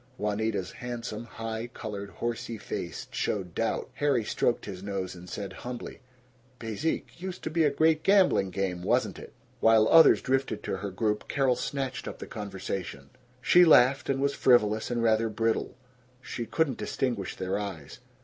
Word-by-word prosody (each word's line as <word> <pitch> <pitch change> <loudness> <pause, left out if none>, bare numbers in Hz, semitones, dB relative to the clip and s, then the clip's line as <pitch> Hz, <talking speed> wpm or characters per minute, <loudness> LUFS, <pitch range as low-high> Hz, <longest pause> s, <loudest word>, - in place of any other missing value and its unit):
Juanita's 105 -2 -1
handsome, 120 -2 -6
high 115 0 -5
colored, 105 -4 -7
horsey 115 +3 -4
face - - -5
showed 95 -5 -2
doubt. - - -2
Harry 145 -5 +1
stroked 120 - 0
his 95 -3 -7
nose 100 -2 -4
and 90 0 -11
said 100 +1 -5
humbly, 120 -1 -7 0.6
"Bezique? 115 +8 -3
Used 185 -1 -6
to - - -3
be 160 -2 +3
great 155 +2 +3
gambling 190 - +4
game, 95 -2 -2
wasn't - - 0
it?" - - -11 0.3
While 110 -1 +5
others 165 -1 +7
drifted 135 +1 0
to - - -2
her 100 +1 -4
group, 105 +2 -1
Carol 135 -3 +2
snatched 130 +1 -3
up - - -6
the - - -7
conversation. 95 - -6 0.3
She 180 +5 +7
laughed 135 -4 +5
and 135 -1 +1
was 140 +1 +1
frivolous 110 -4 +3
and 120 -1 -1
rather 110 0 +3
brittle. 115 +1 -1 0.4
She 120 -2 -6
could 160 -2 +1
not 130 - -4
distinguish 120 -8 -2
their 95 +2 -2
eyes. 95 -8 -7
115 Hz, 160 wpm, -28 LUFS, 100-130 Hz, 0.6 s, others